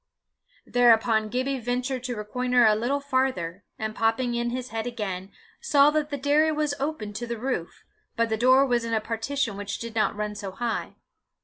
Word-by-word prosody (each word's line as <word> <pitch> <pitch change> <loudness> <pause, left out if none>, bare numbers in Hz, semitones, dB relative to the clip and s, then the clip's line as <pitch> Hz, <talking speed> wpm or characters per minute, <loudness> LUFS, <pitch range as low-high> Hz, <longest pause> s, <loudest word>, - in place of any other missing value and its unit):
Thereupon 225 -2 +4
Gibbie 260 +3 -1
ventured 250 +2 -2
to 245 -1 -3
reconnoitre 245 +3 +1
a 215 - +6
little 245 +6 0
farther, 260 -10 -1
and 220 -1 -3
popping 225 +3 +1
in 235 0 -1
his 250 +1 -4
head 225 +1 -3
again, 195 -5 -4 0.3
saw 295 -10 +5
that 305 -1 0
the 285 - -3
dairy 295 +3 +3
was 300 -1 0
open 270 -8 -3
to 235 +3 -5
the 235 0 -3
roof, 230 -8 -4 0.3
but 230 0 +1
the 220 - +1
door 255 +4 +5
was 240 -3 +1
in 230 -1 -1
a - - +2
partition 225 +1 -2
which 205 0 -4
did 230 -1 -7
not 220 -1 +1
run 210 0 -3
so 200 -2 -6
high. 235 +2 -3
240 Hz, 190 wpm, -26 LUFS, 220-260 Hz, 0.3 s, a